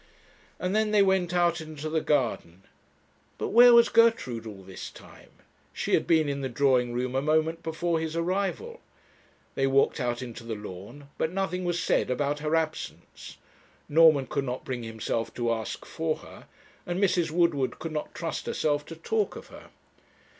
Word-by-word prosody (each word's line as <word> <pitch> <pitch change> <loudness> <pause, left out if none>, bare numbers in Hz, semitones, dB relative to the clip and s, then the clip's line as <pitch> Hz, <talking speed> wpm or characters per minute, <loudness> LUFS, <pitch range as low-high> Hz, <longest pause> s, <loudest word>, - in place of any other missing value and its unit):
And 185 +2 -2
then 215 0 +2
they 210 -1 +5
went 190 -3 +2
out 175 -2 +2
into 155 -1 -7
the 160 0 0
garden. 115 - -1 0.7
But - - -3
where 240 +2 +8
was 235 0 +7
Gertrude 220 - +2
all 100 -3 -9
this 95 0 -8
time? - - -16 0.4
She - - -3
had - - +2
been 160 -2 +3
in 140 -1 -2
the 135 - -2
drawing 125 -1 +2
room 125 +1 -2
a 135 - +1
moment 160 +2 +1
before 165 +1 -1
his 160 0 -4
arrival. 195 - -2 0.7
They 135 - +1
walked 135 +1 +2
out 120 0 -2
into 115 -1 -8
the 115 -1 -4
lawn, 105 +8 -10
but 160 - 0
nothing 185 -1 -2
was 175 -1 0
said - - +1
about 145 +3 -1
her 155 +2 0
absence. 160 -1 -4 0.5
Norman 155 -3 +5
could 140 +2 -2
not 125 0 -5
bring 125 -2 -4
himself 115 0 -3
to 120 -1 0
ask 110 -1 -5
for - - -2
her, - - -14 0.4
and 175 +1 -2
Mrs. 185 -4 +2
Woodward 155 -5 +1
could 165 - -6
not 150 -1 -5
trust 165 -2 -4
herself 145 -1 0
to 165 - -8
talk 210 +6 -1
of - - -10
her. - - -13
155 Hz, 175 wpm, -27 LUFS, 125-175 Hz, 0.7 s, where